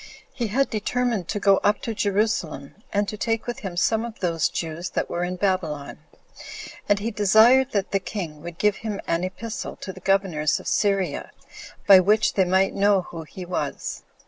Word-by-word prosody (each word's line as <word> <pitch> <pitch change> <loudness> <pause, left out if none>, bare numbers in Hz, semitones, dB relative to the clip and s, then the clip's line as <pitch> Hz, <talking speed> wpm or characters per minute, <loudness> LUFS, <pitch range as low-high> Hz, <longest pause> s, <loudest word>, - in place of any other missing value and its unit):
He 240 -3 -2
had 270 +7 0
determined 225 -3 -1
to 205 - -2
go 195 -1 +5
up 205 0 +2
to 230 - -2
Jerusalem, 200 -8 -1 0.2
and 205 0 +1
to 215 - -5
take 225 +1 -1
with 240 -1 -4
him 185 -4 -6
some 220 +5 +2
of 235 -2 -7
those 165 -4 +1
Jews 165 +1 -4
that - - -3
were 175 0 -1
in 180 +1 -2
Babylon; 180 -7 -2 0.9
and 205 - +4
he 220 +3 -3
desired 225 +6 +5
that 200 -2 -1
the 195 - +2
king 170 -7 -6
would 170 0 -8
give 210 0 +2
him 210 -2 -4
an 165 +1 0
epistle 190 +5 -5
to 190 - -7
the 185 - -11
governors 185 -6 +1
of - - -10
Syria, 195 -6 0 0.6
by 195 -2 +9
which 210 +4 +3
they 190 - +3
might 190 +2 +2
know 200 -1 +3
who 165 -2 -8
he 180 +3 -9
was. 180 - -4
195 Hz, 190 wpm, -24 LUFS, 180-215 Hz, 0.9 s, by